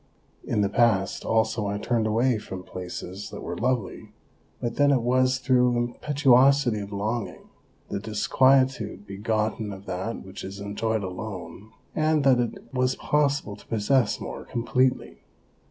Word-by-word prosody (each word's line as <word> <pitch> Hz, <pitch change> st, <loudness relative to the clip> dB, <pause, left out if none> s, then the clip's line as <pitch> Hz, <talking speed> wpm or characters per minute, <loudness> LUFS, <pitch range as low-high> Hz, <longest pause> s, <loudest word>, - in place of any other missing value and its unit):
In 105 Hz, -, 0 dB
the 100 Hz, -, +3 dB
past 100 Hz, -3 st, +2 dB
also 110 Hz, -1 st, +1 dB
I 100 Hz, 0 st, -2 dB
turned 115 Hz, +1 st, 0 dB
away 115 Hz, +2 st, +2 dB
from 95 Hz, -3 st, -8 dB
places 90 Hz, +2 st, -7 dB
that -, -, -8 dB
were -, -, -4 dB
lovely, 125 Hz, -7 st, -2 dB, 0.5 s
but 120 Hz, -1 st, -3 dB
then 145 Hz, 0 st, +5 dB
it 130 Hz, -4 st, +2 dB
was 130 Hz, +1 st, +3 dB
through 125 Hz, -1 st, +3 dB, 0.3 s
impetu 145 Hz, -1 st, -4 dB
osity 130 Hz, -3 st, +4 dB
of 100 Hz, 0 st, -7 dB
longing, 105 Hz, +3 st, -4 dB, 0.4 s
the -, -, -2 dB
disquietude 115 Hz, +1 st, +2 dB
begotten 110 Hz, +2 st, -2 dB
of 100 Hz, 0 st, -9 dB
that 95 Hz, +5 st, -4 dB
which 95 Hz, -, -9 dB
is 95 Hz, +1 st, -7 dB
enjoyed 105 Hz, +2 st, -2 dB
alone, 95 Hz, +1 st, -7 dB, 0.3 s
and 155 Hz, -1 st, +2 dB
that 130 Hz, -3 st, +5 dB
it 120 Hz, +2 st, -4 dB
was 130 Hz, 0 st, +1 dB
possible 145 Hz, -7 st, 0 dB
to -, -, -18 dB
possess 115 Hz, +1 st, +1 dB
more -, -, -6 dB
completely. 125 Hz, +2 st, 0 dB
110 Hz, 150 wpm, -26 LUFS, 100-130 Hz, 0.5 s, then